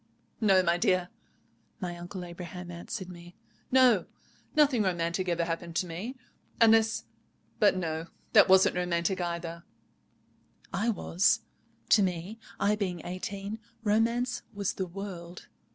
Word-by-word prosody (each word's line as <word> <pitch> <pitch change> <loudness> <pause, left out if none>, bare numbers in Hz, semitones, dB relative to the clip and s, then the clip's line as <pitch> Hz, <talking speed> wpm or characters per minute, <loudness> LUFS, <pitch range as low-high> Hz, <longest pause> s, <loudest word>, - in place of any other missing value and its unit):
"No, 195 -4 +5
my 170 -1 +2
dear," 180 0 +2 0.7
my 180 -3 -4
Uncle 175 +1 -7
Abraham 175 +1 -8
answered 175 +3 -6
me, 175 -1 -12 0.4
"no—nothing 255 - +2
romantic 180 -1 0
ever 170 -1 +1
happened 165 0 -4
to 180 - +1
me—unless—but 220 +1 0
no: 165 -2 -3 0.3
that 205 -3 +7
wasn't 190 -1 +6
romantic 180 +1 0
either——" 170 -1 -4 1.1
I 205 +5 +1
was. 195 -3 +2 0.5
To 215 - +6
me, 185 +3 -2 0.2
I 205 +1 +3
being 185 -5 -3
eighteen, 200 +4 -5 0.2
romance 235 +3 +1
was 200 -2 -1
the 190 - -3
world. 180 -2 -8
185 Hz, 115 wpm, -29 LUFS, 175-210 Hz, 1.1 s, that